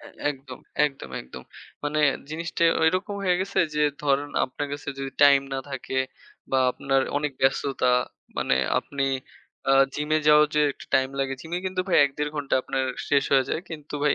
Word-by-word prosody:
অ্যা, 290 - -12 0.2
একদম। 135 -1 -9 0.3
একদম, 135 - -8
একদম। 65 - -10 0.4
মানে 150 +1 0 0.3
জিনিসটা 170 +1 -1 0.2
ওইরকম 185 +5 +1
হয়ে 180 -1 +3
গেছে 195 +1 -2 0.2
যে 150 - +1 0.2
ধরেন 145 0 +1
আপনার 140 +3 -5
কাছে 145 0 -6
যদি 135 0 -4
টাইম 140 -1 +7
না - - -1
থাকে 130 0 -3 0.5
বা 135 - +3
আপনার 135 +1 0 0.2
অনেক 145 0 -1
ব্যস্ততা 135 -1 +2 0.5
মানে 65 - +2 0.2
আপনি 140 -1 -3 0.6
অ্যা 135 - +5 0.2
জিমে 150 +1 +1
যাওয়ার 150 0 +7
যে 150 - +3
একটু - - -13
টাইম 130 0 +3
লাগে। 135 0 -1
জিমে 170 +4 -4
কিন্তু 185 0 -1
ভাই 180 - +3
১-১.৫ 145 +2 -3
ঘণ্টা 145 -2 -1
আপনার 135 0 -1 0.2
শেষ 140 -1 +3
হয়ে 135 -1 +5
যায়। - - -1
কিন্তু 150 -2 -8
ভাই 145 - +4
145 Hz, 175 wpm, -25 LUFS, 135-155 Hz, 0.6 s, টাইম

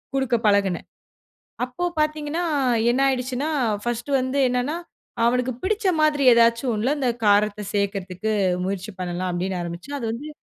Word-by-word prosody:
குடுக்க 265 -3 +1
பழகுனேன். 200 -3 +1 0.8
அப்போ 255 +8 -5 0.2
பாத்தீங்கன்னா 305 +2 -1 0.5
என்ன 265 - 0
ஆயிடுச்சுன்னா, 260 +3 -1 0.3
ஃபர்ஸ்ட்டு 240 +4 0
வந்து 260 +2 -1
என்னென்னா, 250 +6 -1 0.5
அவனுக்கு 250 +1 +1
பிடிச்ச 420 +1 0 0.2
மாதிரி 295 -3 +2
ஏதாச்சும் 235 +1 +3
ஒண்ணுல 260 +8 0
இந்த 250 -2 +2 0.2
காரத்தை 205 0 +3
சேக்கிறதுக்கு 200 +1 -2 0.3
முயற்சி 195 +1 -4
பண்ணலாம் 180 +1 -2
அப்டின்னு 180 +1 -2
ஆரம்பிச்சா, 170 +12 -6
அது 230 - -3
வந்து 280 +7 -6
240 Hz, 130 wpm, -23 LUFS, 200-275 Hz, 0.8 s, ஏதாச்சும்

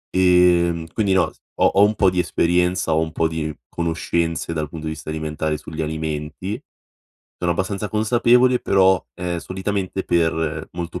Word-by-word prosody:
Ehm, 90 -2 +4
quindi 100 -4 +1
no 95 - +2
s - - -29 0.2
ho - - +2
ho 100 - +5
un 105 +1 +3
po' 95 -3 +3
di 90 - -1
esperienza, 90 0 +1
ho 80 - +3
un 80 -1 -1
po' 80 -1 +1
di 80 -1 -3 0.2
conoscenze 85 0 -2
dal 75 -2 -3
punto 80 0 -8
di 80 - -2
vista 80 0 -7
alimentare 80 0 -2
sugli 80 +2 -6
alimenti. 80 +5 -4 0.8
Sono 90 - -1
abbastanza 95 +3 -3
consapevole 120 +3 +3
però, 95 -2 +3
ehm, 90 -1 -3
solitamente 95 +1 -3
per 80 -2 0
molto 85 -1 -5
85 Hz, 165 wpm, -21 LUFS, 80-95 Hz, 0.8 s, ho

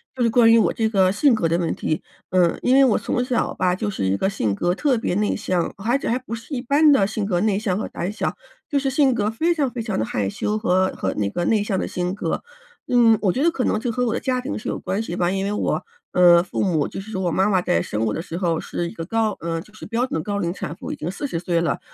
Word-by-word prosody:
就 250 - -4
是 230 - +3
关 230 -1 +5
于 230 - +6
我 - - +3
这 220 -1 0
个 190 -3 +3
性 260 +6 +3
格 195 -7 +1
的 170 - +2
问 170 -2 -1
题， 155 - -2 0.3
嗯， 180 -2 +2
因 255 - +3
为 275 0 +7
我 230 - +3
从 245 - -1
小 250 -2 0
吧， 180 -1 +1
就 210 +2 -2
是 190 - -3
一 95 +1 +2
个 190 - 0
性 110 - -1
格 175 - 0
特 280 +3 +2
别 185 - -1
内 210 0 +1
向， 180 -4 -1
而 230 +7 +1
且 - - -5
还 245 +3 +1
不 230 -2 -6
是 230 +6 -10
一 245 - -2
般 290 +4 +4
的 200 -9 +4
性 215 0 -3
格 180 -3 0
内 210 -2 +2
向 200 -3 -1
和 - - -3
胆 175 +3 -4
小， 215 - -2 0.3
就 290 - +1
是 275 -1 0
性 265 -2 +3
格 210 -1 0
非 330 +9 +1
常 280 -5 0
非 240 -2 -4
常 215 -3 -3
地 110 - 0
害 100 -3 -1
羞 210 - -2
和 185 -3 +2
和 95 - -2
那 105 - 0
个 175 - -2
内 215 0 +2
向 195 -3 -1
的 - - -2
性 180 +1 -2
格。 175 -5 -3 0.4
嗯， 230 -3 +5
我 195 -3 +2
觉 260 - -2
得 335 - +4
可 265 -6 -2
能 215 - +1
就 235 +1 -2
和 250 +1 0
我 230 - 0
的 - - -1
家 255 -1 -1
庭 260 -2 -4
是 - - -8
有 - - -2
关 200 +3 -2
系 175 -6 -4
吧， 175 0 +1
因 195 0 -1
为 200 - -1
我， 210 - -1 0.3
嗯， 175 -1 +6
父 - - -3
母 170 -7 +1
就 - - -6
是 205 +3 -9
说 190 -3 -3
我 175 - 0
妈 190 +4 +2
妈 185 -3 +2
在 85 - +1
生 105 +5 -3
我 110 -2 0
的 165 - -3
时 165 - -8
候 170 -3 0
是 170 -1 -4
一 - - -11
个 165 - -6
高 220 +2 0
呃， 165 0 -3
就 210 - -17
是 215 - -10
标 235 +2 0
准 160 -11 -3
高 205 +4 -3
龄 175 -3 -1
产 170 -3 -6
妇， - - -7
已 - - -3
经 160 - -4
40 190 - -3
岁 170 -1 0
了， 170 - -1
205 Hz, 315 characters per minute, -22 LUFS, 175-235 Hz, 0.4 s, 为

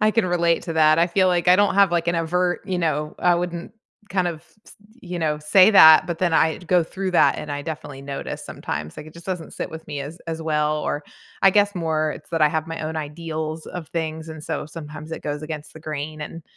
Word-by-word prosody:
I 215 0 +4
can 215 -3 +1
relate 170 -1 +1
to 165 - -4
that. 155 0 +5
I 170 - +4
feel 185 +1 +2
like 175 0 +1
I 180 - +7
don't 205 -1 +3
have, 200 -2 +5
like, 170 0 +1
an 170 - +1
overt, 175 +2 0
you 185 -2 -2
know, 155 -2 -1
I 175 -1 +4
wouldn't 175 0 -4 0.4
kind 185 -2 0
of, 165 -2 -5 0.3
s - - -15 0.3
you 180 -4 -6
know, 155 -2 0
say 185 +7 +6
that, 160 -6 +8
but 170 -2 -4
then 175 -2 +1
I 160 0 +3
d 175 - -15
go 180 -1 +4
through 190 +3 -4
that, 175 - +4
and 150 -1 -5
I 145 - -4
definitely 145 -3 -7
notice 140 0 -6
sometimes, 75 +1 -6
like, 150 - -8
it 155 - -12
just 170 0 -13
doesn't 180 -4 -4
sit - - -5
with 160 0 -9
me 145 - -5
as 150 +5 -7
as 165 -1 -4
well 150 -1 0
or 145 0 -3 0.4
I 195 - +7
guess 205 +1 +3
more 160 -3 0
it's 150 - -12
that 165 -2 0
I 150 - +6
have 160 +1 -2
my 165 0 -5
own 160 +1 -4
ideals 155 +1 -5
of 175 -4 -7
things, 160 -1 -4
and 160 -1 -8
so, - - -4
sometimes 155 0 -9
it - - -6
goes 145 0 -4
against 155 -1 -7
the 160 - -11
grain, 155 0 -5
and 165 +2 -8
160 Hz, 250 wpm, -23 LUFS, 155-175 Hz, 0.4 s, that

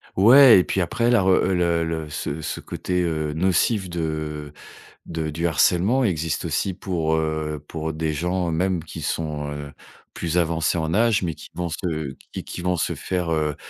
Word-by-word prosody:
Ouais 120 +3 +8
et - - +3
puis 95 - -2
après, 115 +7 0
la 120 -4 +4
re 95 - 0
heu, 95 0 +3
le 85 -2 +1
le 80 -2 -3
ce 75 +1 -4
ce 75 - -4
côté, 90 0 -2
heu, 80 -3 -1
nocif 95 +4 +1
de 75 -3 -4 0.5
de 80 -1 -3
du 85 +3 -1
harcèlement 95 - +3
existe 80 - -1
aussi 95 - -1
pour, 85 -4 -1
heu, 80 -1 -2
pour 80 -1 -4
des 80 0 -1
gens 90 +3 -1
même 90 +1 0
qui 80 +1 -8
sont, 75 -1 -3
heu, 75 -1 -6 0.4
plus 85 0 -2
avancés 85 0 +1
en 80 0 -1
âge, 110 +1 +3
mais 85 -2 -1
qui 75 - -13
vont 90 -1 -3
se 80 -4 -3 0.2
qui - - -5
qui - - -7
vont 90 0 +1
se - - -1
faire 90 -3 -2
heu, 75 -2 0
85 Hz, 190 wpm, -23 LUFS, 80-90 Hz, 0.5 s, Ouais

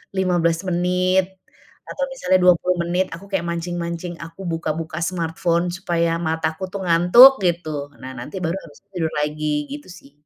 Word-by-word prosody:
15 175 -2 +1
menit 180 +1 +1 0.6
atau - - -4
misalnya - - +1
20 180 0 +4
menit, 180 +2 0
aku 185 - -12
kayak 185 -3 -1
mancing-mancing 170 0 -4
aku 170 +3 -9
buka-buka 160 0 -3
smartphone 170 0 -1
supaya 170 -2 -1
mataku 160 0 -2
tuh 200 -1 -5
ngantuk 180 +11 +7
gitu. 155 -5 -2
Nah 130 0 -7
nanti 120 - -8
baru 165 +2 -1
habis 145 - -15
tuh 200 - -50
tidur 160 -3 -1
lagi 150 +1 -2 0.2
gitu 290 -5 -8
sih. 175 -6 -14
170 Hz, 150 wpm, -21 LUFS, 165-180 Hz, 0.6 s, ngantuk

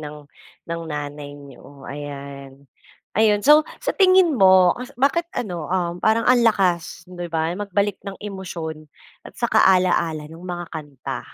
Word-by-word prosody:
ng 150 -1 -9 0.4
ng 170 0 -4
nanay 145 -1 -6
niyo 140 0 -14
ayan, 140 -1 -9 0.5
ayon, 210 -1 +3
so, 300 +1 +7 0.2
sa - - -2
tingin 370 -3 +5
mo, 185 -4 +6
as 250 +2 -8
bakit 335 +6 +1
ano, 175 -8 -4
um, 175 -1 -1
parang 220 +1 +2
ang 245 -1 +5
lakas, 180 -6 +1
'di 175 -1 -7
ba? 160 0 -1
Magbalik 200 +1 -2
ng 195 -1 -7
emosyon 170 -6 -7 0.4
at - - -20
saka - - +2
ala-ala 170 -4 +1
nong 165 +3 -13
mga 175 -1 -5
kanta? 145 -4 -6
175 Hz, 150 wpm, -22 LUFS, 150-205 Hz, 0.5 s, so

